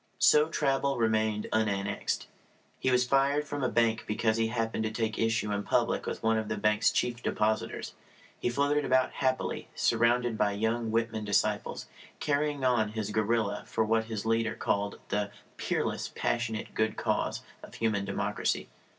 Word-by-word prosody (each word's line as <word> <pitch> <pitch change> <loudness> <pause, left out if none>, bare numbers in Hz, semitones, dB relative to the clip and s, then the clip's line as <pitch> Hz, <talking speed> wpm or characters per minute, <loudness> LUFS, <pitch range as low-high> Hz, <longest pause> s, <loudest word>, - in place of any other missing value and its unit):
So 150 +1 +5
Traubel 140 -3 0
remained 110 -2 +1
unannexed. 105 -2 0 0.5
He - - +1
was 125 0 +3
fired 140 +3 +2
from 145 -1 -4
a 130 - +2
bank 115 -1 +1
because 110 +1 +1
he 115 0 +2
happened 115 -1 -1
to - - 0
take 110 -1 -2
issue 115 -2 +1
in 100 0 0
public - - 0
with - - -4
one 110 0 +3
of 110 - -4
the 105 - -2
bank's 105 +1 +3
chief 120 -1 -1
depositors. 110 -1 -1 0.5
He - - 0
floated 145 +4 +1
about 130 -1 +2
happily, 130 0 -1
surrounded 120 0 +2
by 105 -1 +2
young 110 +2 -1
Whitman 110 -1 -1
disciples, 105 -1 0 0.3
carrying 145 -1 0
on 110 -4 +2
his 110 -1 -3
guerrilla 110 -1 0
for 110 - 0
what 110 +1 +2
his 110 -2 -5
leader 115 0 +1
called 100 0 -1
the 105 0 0 0.3
"peerless, - - -1
passionate, 115 -2 -2
good 110 0 0
cause" - - -1 0.2
of - - -12
human 110 -3 0
democracy. 100 0 -1
115 Hz, 160 wpm, -29 LUFS, 110-125 Hz, 0.5 s, So